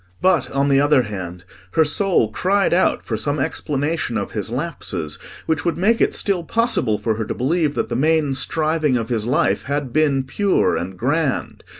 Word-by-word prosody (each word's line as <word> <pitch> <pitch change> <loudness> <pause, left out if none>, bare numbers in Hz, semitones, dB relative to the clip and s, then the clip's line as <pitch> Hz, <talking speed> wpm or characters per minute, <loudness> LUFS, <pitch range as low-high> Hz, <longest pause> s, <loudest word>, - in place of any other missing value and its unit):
But, 175 -7 +2
on 140 +1 0
the 135 0 +4
other 145 -3 +4
hand, 90 -5 -6 0.3
her 160 - +4
soul 150 - +1
cried 195 - +1
out 185 - +2
for 115 - -2
some 145 +6 -2
explanation 145 -1 -1
of 100 - -3
his 105 -1 -4
lapses 110 - -4 0.3
which 160 -1 0
would 170 -2 -1
make 215 +6 +2
it - - +2
still 190 -4 0
possible 170 - +1
for 110 -1 -1
her 110 - -2
to - - -4
believe 150 +2 0
that - - -1
the - - -2
main 155 0 +2
striving 155 0 +1
of 115 -2 -4
his 115 -2 -1
life 130 - +1
had 140 -2 -3
been 145 -3 +2
pure 195 +9 +1
and 90 +2 -4
grand. 145 - -1
145 Hz, 190 wpm, -20 LUFS, 115-165 Hz, 0.3 s, the